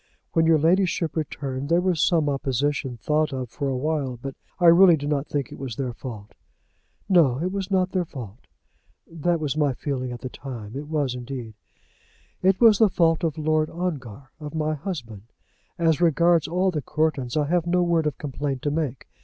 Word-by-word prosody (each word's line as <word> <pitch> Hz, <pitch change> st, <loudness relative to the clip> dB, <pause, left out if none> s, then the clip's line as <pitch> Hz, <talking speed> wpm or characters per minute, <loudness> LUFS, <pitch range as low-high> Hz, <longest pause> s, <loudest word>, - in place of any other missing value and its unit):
When 165 Hz, 0 st, +3 dB
your 165 Hz, -1 st, +5 dB
ladyship 170 Hz, 0 st, +1 dB
returned 140 Hz, -3 st, -4 dB
there 170 Hz, +1 st, +4 dB
was 180 Hz, -4 st, +1 dB
some 160 Hz, -4 st, +3 dB
opposition 140 Hz, -1 st, -1 dB
thought 150 Hz, +6 st, 0 dB
of 130 Hz, -3 st, -5 dB
for 140 Hz, -2 st, -3 dB
a 130 Hz, -, -1 dB
while, 140 Hz, -3 st, -1 dB
but 135 Hz, +2 st, -6 dB, 0.3 s
I 175 Hz, -, +2 dB
really 170 Hz, 0 st, +8 dB
do 145 Hz, -, -5 dB
not 145 Hz, -1 st, -1 dB
think 140 Hz, -4 st, -3 dB
it -, -, -10 dB
was 130 Hz, -4 st, -5 dB
their 130 Hz, -1 st, -3 dB
fault." 110 Hz, -4 st, -9 dB, 0.7 s
"No; 165 Hz, -10 st, +4 dB
it 175 Hz, +6 st, -2 dB
was 195 Hz, -1 st, -3 dB
not 185 Hz, -1 st, +1 dB
their 185 Hz, -2 st, 0 dB
fault." 120 Hz, -8 st, -10 dB, 0.6 s
"That 170 Hz, +1 st, -1 dB
was 150 Hz, -2 st, -2 dB
my 145 Hz, -4 st, +1 dB
feeling 130 Hz, -2 st, -3 dB
at 120 Hz, -, -7 dB
the 130 Hz, -, -5 dB
time; 120 Hz, -5 st, -8 dB
it 145 Hz, +2 st, -5 dB
was 145 Hz, -5 st, -1 dB
indeed." 125 Hz, -2 st, -6 dB, 0.9 s
"It 190 Hz, 0 st, +3 dB
was 225 Hz, -4 st, +6 dB
the 220 Hz, -2 st, +6 dB
fault 165 Hz, -2 st, +2 dB
of 160 Hz, -2 st, -1 dB
Lord 155 Hz, 0 st, +1 dB
Ongar, 140 Hz, -, -5 dB
of 150 Hz, 0 st, -7 dB
my 155 Hz, 0 st, 0 dB
husband. 140 Hz, -, -6 dB, 0.6 s
As 165 Hz, -1 st, +2 dB
regards 170 Hz, 0 st, +3 dB
all 185 Hz, +2 st, +1 dB
the 155 Hz, -4 st, -2 dB
Courtons 150 Hz, -4 st, -1 dB
I 150 Hz, -, +2 dB
have 175 Hz, -1 st, +1 dB
no 180 Hz, +1 st, +2 dB
word 170 Hz, -3 st, +2 dB
of 150 Hz, -, -3 dB
complaint 140 Hz, -2 st, -4 dB
to 145 Hz, -, 0 dB
make. 145 Hz, -5 st, -3 dB
150 Hz, 195 wpm, -24 LUFS, 135-170 Hz, 0.9 s, really